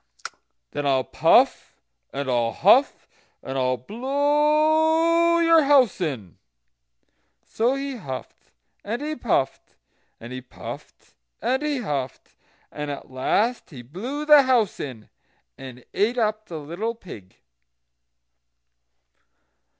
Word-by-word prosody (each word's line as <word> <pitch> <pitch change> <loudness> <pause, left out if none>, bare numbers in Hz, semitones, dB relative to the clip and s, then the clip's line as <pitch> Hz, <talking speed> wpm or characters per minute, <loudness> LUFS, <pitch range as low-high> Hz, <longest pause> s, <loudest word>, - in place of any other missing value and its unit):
"Then 145 -1 -3
I'll 135 -1 +2
puff, - - +2 0.4
and 140 0 -4
I'll 120 -3 0
huff, - - +3 0.4
and 135 - -6
I'll 130 -1 0
blow 305 - +2
your 330 -1 +5
house 265 -9 +4
in." 125 - -4 1.1
So 240 +4 0
he 275 -1 -4
huffed, 130 - -9 0.3
and 225 +4 -3
he 310 +1 -3
puffed, 225 - -2 0.4
and 120 +2 -9
he 130 - -6
puffed 125 - -11 0.3
and 260 +2 0
he 295 -3 -2
huffed, 140 - -5 0.4
and 150 0 -5
at 140 -2 -7
last 210 - 0
he 130 -8 -11
blew 240 - -6
the 300 -1 +8
house 250 -6 +1
in, 120 -6 -7 0.5
and 125 -2 -11
ate 225 +5 +1
up 215 -1 -1
the 165 - -7
little 175 +10 -4
pig. 105 - -12
215 Hz, 115 wpm, -23 LUFS, -, 1.1 s, the